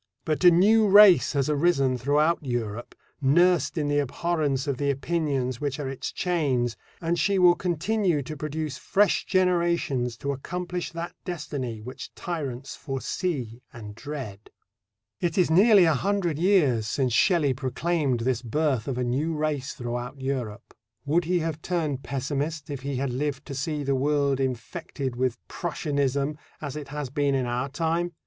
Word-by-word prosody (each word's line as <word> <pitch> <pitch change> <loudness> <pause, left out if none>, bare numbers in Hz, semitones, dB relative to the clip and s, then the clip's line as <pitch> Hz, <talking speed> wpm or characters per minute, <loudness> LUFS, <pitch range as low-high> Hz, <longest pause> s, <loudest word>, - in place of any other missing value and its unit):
But 155 +2 -1
a 180 - +10
new 210 +6 +5
race 200 -4 +7
has 140 -2 +1
arisen 145 -4 +2
throughout 150 +6 +1
Europe, 120 -3 -4 0.3
nursed 170 +4 +3
in 150 -2 0
the 145 0 +2
abhorrence 145 -1 -1
of 140 -3 -2
the 140 +1 0
opinions 140 -3 -1
which 145 -1 -2
are 145 - -3
its 135 -1 -4
chains, 135 -10 0 0.2
and 170 0 -1
she 195 +5 +2
will 180 -1 +7
continue 180 -1 0
to 155 +4 -6
produce 150 -1 -4
fresh 205 +1 +2
generations 170 - +1
to 140 - -2
accomplish 180 +5 -4
that 170 +1 -5
destiny 140 -9 -4
which 125 +4 -9
tyrants 140 -7 -5
foresee 135 - -3
and 105 -3 -9
dread. 115 -5 -7 0.7
It 170 -2 -1
is 180 -4 +3
nearly 200 +2 +6
a 160 - +4
hundred 175 -1 0
years 150 - +3
since 125 +1 0
Shelley 155 - +3
proclaimed 135 0 -1
this 120 -1 0
birth 130 -1 0
of 130 -3 -2
a 125 - 0
new 140 +7 -1
race 150 -3 -2
throughout 120 +1 -5
Europe. 130 -5 -4 0.3
Would 160 +4 +2
he 180 +2 +1
have 160 -1 -3
turned 155 -7 -2
pessimist 145 +3 -3
if 140 -2 -5
he 140 +1 -3
had 135 0 -1
lived 140 +1 -2
to 140 - -7
see 145 +2 -2
the 140 0 0
world 140 0 +1
infected 130 +1 -3
with 125 -1 0
Prussianism 145 -3 -1 0.2
as 145 -2 -5
it 150 -2 -6
has 145 -2 -5
been 140 0 +1
in 130 -2 0
our 120 +3 -2
time? 165 +4 -1
145 Hz, 160 wpm, -26 LUFS, 130-170 Hz, 0.7 s, a